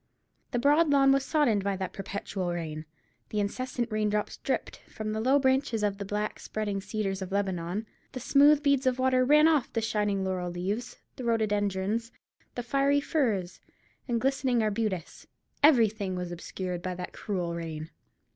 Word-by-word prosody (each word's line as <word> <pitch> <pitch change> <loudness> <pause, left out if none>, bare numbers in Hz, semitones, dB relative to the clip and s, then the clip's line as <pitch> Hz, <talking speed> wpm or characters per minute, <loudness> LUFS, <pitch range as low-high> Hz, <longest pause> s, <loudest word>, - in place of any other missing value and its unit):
The - - -2
broad 295 +6 +4
lawn 275 -1 +5
was 275 0 +3
soddened 270 -10 +2
by 200 0 0
that 190 0 -4
perpetual 195 -2 -4
rain. 160 -2 -4 0.4
The 210 - -2
incessant 240 +3 -2
rain 215 0 +1
drops 210 0 -2
dripped - - -3
from 215 -1 -4
the 220 0 -2
low 260 +4 +4
branches 265 -5 +1
of 200 -1 0
the 200 - -4
black 210 +2 -3
spreading 205 -2 -3
cedars 200 -1 -3
of 190 0 -5
Lebanon; 190 0 -1 0.3
the 255 - -4
smooth 285 +3 +5
beads 280 -2 +3
of 255 -1 +2
water 255 0 +3
ran 300 +4 +6
off 300 -6 +2
the 230 - 0
shining 210 -3 0
laurel 185 -2 -2
leaves; 195 +7 -3 0.2
the 255 - -6
rhododendrons, 215 -1 0 0.4
the 245 - -3
feathery 275 +3 +2
furze, 225 - -1 0.5
the 240 - -2
glistening 255 -1 +1
arbutus—everything 215 - 0
was 180 -1 -4
obscured 180 +1 -5
by 185 0 -3
that 180 0 -7
cruel 180 -5 -3
rain. 160 -2 -5
215 Hz, 165 wpm, -28 LUFS, 190-255 Hz, 0.5 s, ran